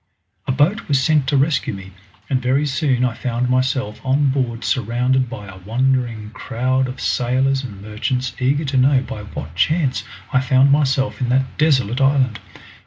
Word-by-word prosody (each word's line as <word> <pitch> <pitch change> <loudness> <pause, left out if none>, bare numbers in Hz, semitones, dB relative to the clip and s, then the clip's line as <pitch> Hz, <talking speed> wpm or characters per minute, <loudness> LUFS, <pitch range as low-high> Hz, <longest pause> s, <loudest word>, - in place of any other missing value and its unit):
A - - +1
boat 155 - +1
was 140 -3 +2
sent 150 0 +2
to 140 - +2
rescue 140 -6 +1
me, 95 0 -10 0.4
and 130 -3 0
very 130 +4 +1
soon 130 -3 +1
I 120 - -1
found 125 +1 -2
myself 130 -4 0
on 135 +2 +2
board 120 -4 -2
surrounded 125 +1 0
by 105 -5 -8
a 95 -1 -11
wondering 115 0 -1
crowd 130 +3 -1
of 130 +1 -7
sailors 130 +2 +1
and 100 -6 -9
merchants 125 +5 -2
eager 140 +4 +1
to 135 -1 -1
know 130 0 +4
by 105 - -7
what 80 -7 -8
chance 150 - +1 0.3
I 130 - +4
found 130 +1 +3
myself 135 -2 +1
in 125 - 0
that 130 +1 0
desolate 135 -5 +2
island. 135 -4 +2
130 Hz, 175 wpm, -20 LUFS, 120-135 Hz, 0.4 s, know